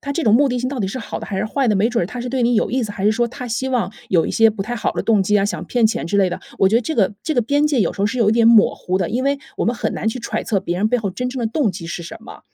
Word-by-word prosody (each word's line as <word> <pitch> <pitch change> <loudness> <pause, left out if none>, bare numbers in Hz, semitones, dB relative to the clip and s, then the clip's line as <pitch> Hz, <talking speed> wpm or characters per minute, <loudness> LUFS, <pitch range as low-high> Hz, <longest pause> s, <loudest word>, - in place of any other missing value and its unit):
他 280 - -6
这 305 +4 -1
种 215 - +4
目 280 +4 +4
的 250 -1 -1
性 255 +1 -2
到 270 -3 -4
底 195 - -1
是 225 - -5
好 230 - -6
的 - - -7
还 195 - -4
是 190 - -1
坏 260 +4 0
的， 210 - +2
没 215 +5 +2
准 240 -4 0
儿 - - -1
他 230 +6 -8
是 245 +1 -4
对 260 -1 0
你 240 +1 +2
有 220 - +1
意 255 +1 0
思， 215 - -4
还 195 - -5
是 210 - +4
说 235 +2 0
他 250 +1 -8
希 245 +3 -2
望 245 -6 -1 0.2
有 170 -4 +3
一 - - -3
些 225 0 +5
不 210 -2 -3
太 235 +5 -4
好 235 - -1
的 - - -3
动 215 -3 +3
机 210 +2 +2
啊， 195 - +1
想 175 -5 -3
骗 240 +2 +2
钱 215 - -2
之 200 - -1
类 195 -2 +3
的。 - - -5 0.2
我 195 - +4
觉 195 - +2
得 230 - +5
这 285 +7 -3
个 210 -3 +1
这 315 - -2
个 245 - +2
边 285 +6 +2
界 290 -5 +1
有 - - -1
时 - - -8
候 200 - +3
是 230 +5 -3
有 225 -4 +3
一 - - +3
点 230 0 +4
模糊 210 -5 +3
的， 185 -3 -1
因 245 +3 -1
为 280 +1 +1 0.2
我 - - 0
们 235 - +1
很 - - -2
难 220 - -2
去 225 - -3
揣 235 - -3
测 205 - 0
别 175 -2 -3
人 210 +3 +2
背 245 - +2
后 215 -5 -2
真 250 +7 -3
正 260 +1 -5
的 235 - 0
动 225 0 0
机 170 -2 -8
是 170 +1 -5
什 170 - -8
么， - - -12
225 Hz, 415 characters per minute, -20 LUFS, 200-250 Hz, 0.2 s, 些